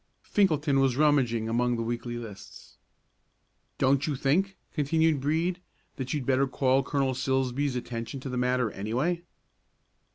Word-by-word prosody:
Finkelton 155 -8 +2
was 130 -2 +2
rummaging 130 -7 +2
among 120 +2 +1
the 115 - -2
weekly 120 +1 -3
lists. 110 -5 -11 1.0
"Don't 135 +2 +2
you 150 - 0
think," 185 +9 +1 0.2
continued 160 0 +2
Brede, 165 +5 0 0.4
"that 130 -1 -4
you'd 145 -5 -2
better 135 +1 +2
call 130 0 +2
Colonel 135 -1 0
Silsbee's 130 +1 0
attention 120 +2 -5
to 135 - -5
the 125 - -4
matter, 125 -2 +1
anyway?" 130 - -1
135 Hz, 135 wpm, -28 LUFS, 125-145 Hz, 1.0 s, Finkelton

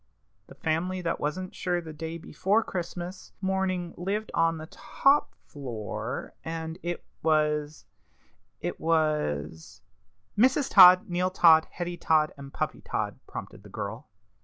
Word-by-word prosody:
The - - -13
family 180 +4 -1
that 165 0 -1
wasn't 185 +5 -3
sure 180 -1 -1
the 160 -2 -8
day 160 +2 -5
before 195 +7 0
Christmas 175 0 -6
morning 190 -2 -1
lived 200 +5 -3
on 165 0 +2
the 155 - -7
top 275 - +1
floor, 120 -7 -5
and 160 +1 -5
it 175 0 -4 0.2
was 150 -1 +1 0.8
it - - -4
was 100 - -1 0.3
" 95 -1 -45
"Mrs. 265 +4 +3
Todd, 185 -2 +9
Neal 180 +1 0
Todd, 165 -3 +6
Hetty 175 0 -5
Todd, 155 -2 +2
and 140 -1 -10
Puppy - - -3
Todd," - - -3
prompted - - -8
the - - -14
girl. 110 +7 -6
165 Hz, 135 wpm, -28 LUFS, 150-185 Hz, 0.8 s, Todd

